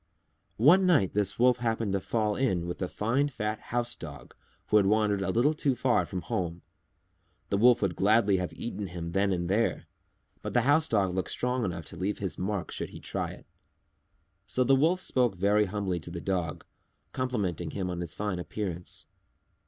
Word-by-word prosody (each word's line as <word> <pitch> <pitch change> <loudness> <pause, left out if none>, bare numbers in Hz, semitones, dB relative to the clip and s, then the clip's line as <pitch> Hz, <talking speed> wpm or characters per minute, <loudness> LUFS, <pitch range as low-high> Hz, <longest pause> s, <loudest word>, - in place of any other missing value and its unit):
One 175 - +6
night 145 - +4
this 105 -1 -1
Wolf 125 0 +4
happened 115 -4 -1
to 100 - +1
fall 105 +1 0
in 95 -11 0
with 90 +2 -5
a 90 - 0
fine 125 +7 +1
fat 110 -5 -3
House 120 0 -2
Dog 70 -6 -10 0.4
who 105 - +5
had 100 -2 +4
wandered 105 -1 +2
a 95 - -1
little 120 +10 +3
too 140 -3 0
far 125 0 +2
from 90 -2 -4
home. 85 -1 -3 0.9
The 100 - +1
Wolf 120 0 +5
would 90 -4 0
gladly 105 -1 +3
have 90 -1 -2
eaten 105 -4 -5
him 85 -1 -6
then 100 +2 +1
and 85 -2 -1
there, 105 +5 0 0.6
but - - -5
the 120 - +4
House 145 +6 +3
Dog 100 -4 +2
looked 95 0 -2
strong 125 0 -1
enough 85 -4 -4
to - - -10
leave 100 +3 -1
his 95 -6 -3
marks 100 0 -2
should - - -4
he - - -10
try - - -3
it. - - -11 1.0
So 125 - +1
the 135 +2 +4
Wolf 165 +7 +2
spoke 125 - +2
very 100 +3 +3
humbly 95 -2 -2
to 85 - -9
the 85 0 -5
Dog, 90 -2 -2 0.5
complimenting 100 -10 -2
him 95 -2 -3
on 90 - -4
his 85 -2 -5
fine 105 -3 -2
appearance. 90 -1 -4
105 Hz, 190 wpm, -29 LUFS, 90-120 Hz, 1.0 s, One